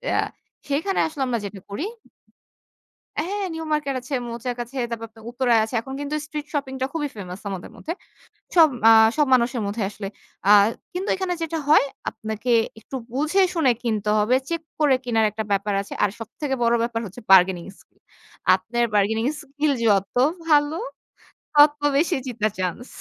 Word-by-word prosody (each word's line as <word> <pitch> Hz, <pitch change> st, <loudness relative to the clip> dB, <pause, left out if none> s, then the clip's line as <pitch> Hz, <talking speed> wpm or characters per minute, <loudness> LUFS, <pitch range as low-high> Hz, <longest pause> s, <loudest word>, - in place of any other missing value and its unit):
আ -, -, +2 dB, 0.5 s
সেখানে 320 Hz, +8 st, 0 dB
আসলে 305 Hz, -3 st, -7 dB
আমরা 235 Hz, -2 st, 0 dB
যেটা 200 Hz, 0 st, -7 dB
করি 200 Hz, +10 st, -4 dB, 1.3 s
হ্যাঁ, 395 Hz, +7 st, -2 dB
নিউ 320 Hz, -, -5 dB
মার্কেট 290 Hz, -3 st, -1 dB
আছে, 255 Hz, +3 st, -8 dB
মৌচাক 235 Hz, +1 st, -4 dB
আছে, 250 Hz, +3 st, -11 dB
তারপর 230 Hz, -1 st, -4 dB
আপনার 220 Hz, 0 st, -17 dB
উত্তরায় 245 Hz, -2 st, +3 dB
আছে। 220 Hz, -, -6 dB
এখন 265 Hz, +3 st, -8 dB
কিন্তু 290 Hz, +1 st, -3 dB
street 300 Hz, -1 st, -6 dB
shopping 275 Hz, -2 st, -2 dB
টা 260 Hz, -, +2 dB
খুবই 300 Hz, -3 st, -2 dB
ফেমাস 185 Hz, -2 st, -8 dB
আমাদের 190 Hz, -3 st, -6 dB
মধ্যে। 330 Hz, -, -5 dB, 0.6 s
সব 330 Hz, -3 st, +8 dB, 0.2 s
আ -, -, +9 dB, 0.3 s
সব 300 Hz, -2 st, +3 dB
মানুষের 240 Hz, -1 st, +1 dB
মধ্যে 210 Hz, +2 st, -3 dB
আসলে। 200 Hz, -1 st, -7 dB, 0.4 s
আ -, -, +7 dB, 0.4 s
কিন্তু 370 Hz, +3 st, -3 dB
এখানে 375 Hz, -1 st, -2 dB
যেটা 325 Hz, 0 st, -2 dB
হয় 300 Hz, -, +6 dB, 0.3 s
আপনাকে 220 Hz, +2 st, -5 dB, 0.3 s
একটু 265 Hz, -, -7 dB, 0.2 s
বুঝে-শুনে 320 Hz, 0 st, +2 dB
কিনতে 215 Hz, -3 st, -1 dB
হবে। 215 Hz, +5 st, +3 dB
চেক 335 Hz, -1 st, -2 dB, 0.2 s
করে 290 Hz, -3 st, +5 dB
কিনার 225 Hz, -2 st, +2 dB
একটা 215 Hz, +1 st, -4 dB
ব্যাপার 200 Hz, +1 st, 0 dB
আছে। 200 Hz, -, -13 dB
আর 205 Hz, -, +2 dB
সবথেকে 265 Hz, +5 st, -4 dB
বড় 235 Hz, 0 st, +3 dB
ব্যাপার 235 Hz, -1 st, -1 dB
হচ্ছে 200 Hz, +6 st, -10 dB
bargaining 185 Hz, -2 st, +5 dB
skill. -, -, -27 dB, 0.6 s
আপনার 230 Hz, +6 st, -1 dB
bargaining 220 Hz, +4 st, +2 dB
skill 295 Hz, +1 st, -1 dB
যত 200 Hz, -2 st, +2 dB, 0.3 s
ভালো 295 Hz, +1 st, +4 dB, 0.8 s
তত 295 Hz, 0 st, +6 dB, 0.2 s
বেশি 340 Hz, +4 st, +2 dB
জিতার 220 Hz, -4 st, -1 dB
চান্স। 185 Hz, +7 st, -3 dB
245 Hz, 165 wpm, -23 LUFS, 215-295 Hz, 1.3 s, আ